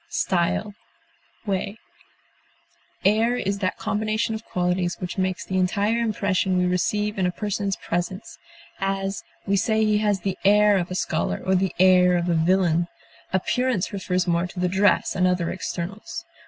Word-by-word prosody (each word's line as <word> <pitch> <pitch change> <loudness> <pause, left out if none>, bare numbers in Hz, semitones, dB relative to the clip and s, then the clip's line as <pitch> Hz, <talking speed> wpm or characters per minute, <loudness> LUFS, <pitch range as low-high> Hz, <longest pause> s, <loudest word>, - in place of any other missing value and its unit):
carriage, 175 +2 +1 0.8
look, 200 0 -2 1.3
Air 220 +4 +3
is 200 -4 -2
that 185 -2 -1
combination 215 +1 -1
of 220 0 -5
qualities 180 -1 -1
which 180 +1 -5
makes 185 -1 -1
the 190 0 -1
entire 200 +5 +1
impression 200 -4 0
we 180 - +2
receive 205 +3 0
in 185 - +2
a - - 0
person's 200 0 -2
presence; 175 +4 -4 0.4
as, 195 0 -2 0.2
we 200 - +1
say 220 +3 +2
he 210 -1 +2
has 205 -3 +1
the 190 0 -3
air 205 0 +5
of 175 - -3
a 185 - -4
scholar, - - -1
or 190 - +2
the 190 0 +1
air 180 -1 +5
of 175 0 -1
a - - +3
villain. 170 0 +2 0.4
Appearance 215 +3 0
refers 185 -2 -1
more 170 0 +1
to 180 - -9
the 180 - +2
dress 195 +3 +2
and 185 -1 +3
other 180 -2 0
externals. 185 +2 -5
190 Hz, 160 wpm, -24 LUFS, 180-205 Hz, 1.3 s, air